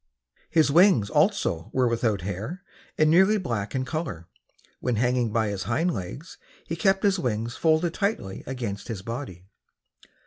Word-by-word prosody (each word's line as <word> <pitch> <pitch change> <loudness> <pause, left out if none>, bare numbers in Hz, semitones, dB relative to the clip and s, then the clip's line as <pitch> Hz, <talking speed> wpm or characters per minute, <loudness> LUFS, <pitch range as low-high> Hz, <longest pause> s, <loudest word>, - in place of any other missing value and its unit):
His 160 -3 +3
wings 165 - +5
also 150 - +1
were 130 -1 +3
without 115 -4 0
hair 100 - -5 0.3
and 155 - +4
nearly 190 +7 +5
black 115 - -3
in 130 0 -1
color. 130 - -4 0.5
When 125 -2 -1
hanging 125 0 +1
by 110 -1 +1
his 100 -2 -4
hind 170 +2 0
legs 115 - -7 0.3
he 165 - -3
kept 195 +3 +2
his 200 -2 +3
wings 115 -3 -2
folded 160 +1 +2
tightly 200 - -2
against 120 -6 -4
his 105 -6 -5
body. 115 -6 -6
125 Hz, 150 wpm, -26 LUFS, 105-165 Hz, 0.5 s, wings